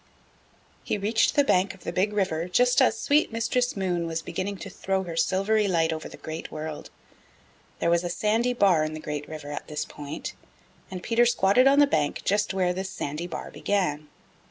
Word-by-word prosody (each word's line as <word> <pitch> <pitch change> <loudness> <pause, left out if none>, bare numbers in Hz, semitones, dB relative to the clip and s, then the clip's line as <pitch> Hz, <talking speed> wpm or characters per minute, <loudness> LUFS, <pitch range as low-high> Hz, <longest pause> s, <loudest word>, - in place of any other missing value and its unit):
He - - -1
reached 215 +3 +1
the 285 - +5
bank 190 -7 +2
of 190 - -19
the 170 - -4
Big 190 +4 +1
River 185 -5 -1
just 245 +8 +3
as 235 -3 +3
sweet 295 -1 +2
Mistress 230 +1 0
Moon 175 -3 -1
was 165 0 -3
beginning 195 +4 -4
to - - -8
throw 190 0 -1
her 170 -3 -6
silvery 195 +5 +2
light 165 -3 +2
over 155 0 -6
the - - -11
Great 160 +1 -7
World. 155 0 -6 0.9
There 170 - +1
was 170 0 +2
a 175 - -2
sandy 225 +7 +1
bar 190 -9 +4
in 155 0 -3
the - - -6
Great 150 -1 -5
River 150 -2 -7
at 145 - -6
this 150 -1 -3
point, 145 +1 -7 0.6
and 185 -1 -7
Peter 240 +1 +3
squatted 235 +3 +4
on 275 +1 +5
the 290 - +7
bank 150 - -1
just 205 +1 +1
where 185 -2 +1
this 190 +1 -4
sandy 155 -2 -4
bar 170 - -6
began. 155 -7 -1
185 Hz, 200 wpm, -26 LUFS, 160-210 Hz, 0.9 s, the